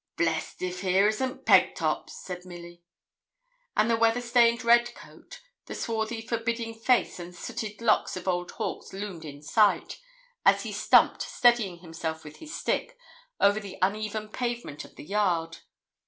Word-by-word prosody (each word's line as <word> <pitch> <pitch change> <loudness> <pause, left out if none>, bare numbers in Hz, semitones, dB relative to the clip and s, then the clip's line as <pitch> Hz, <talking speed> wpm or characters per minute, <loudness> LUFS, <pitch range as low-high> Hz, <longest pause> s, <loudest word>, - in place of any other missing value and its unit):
'Blest 165 +1 -1
if 180 0 -3
here 190 +1 +3
isn't 255 +5 -2
Pegtop,' - - +3
said 180 -1 -8
Milly. 175 -1 -11 1.0
And 215 - +4
the 230 - +3
weather 230 +1 +3
stained 235 -1 +3
red 240 +1 +4
coat, - - -14 0.2
the - - -6
swarthy 225 0 -2
forbidding 230 0 -2
face 230 -2 +1
and 175 0 -9
sooty 210 +4 -6
locks 225 -4 +2
of 185 - -8
old 175 -1 0
Hawkes - - -5
loomed 190 -5 -6
in 145 -1 -10
sight, 210 +5 +2 0.4
as - - +4
he - - -5
stumped, - - +4
steadying 225 -8 +2
himself 165 -2 -5
with 150 0 -11
his 315 -1 -10
stick, - - -2 0.4
over 205 +1 +4
the 200 -3 -9
uneven 215 +2 -1
pavement 240 - -4
of - - -15
the - - -11
yard. 170 -4 0
210 Hz, 155 wpm, -27 LUFS, 175-230 Hz, 1.0 s, And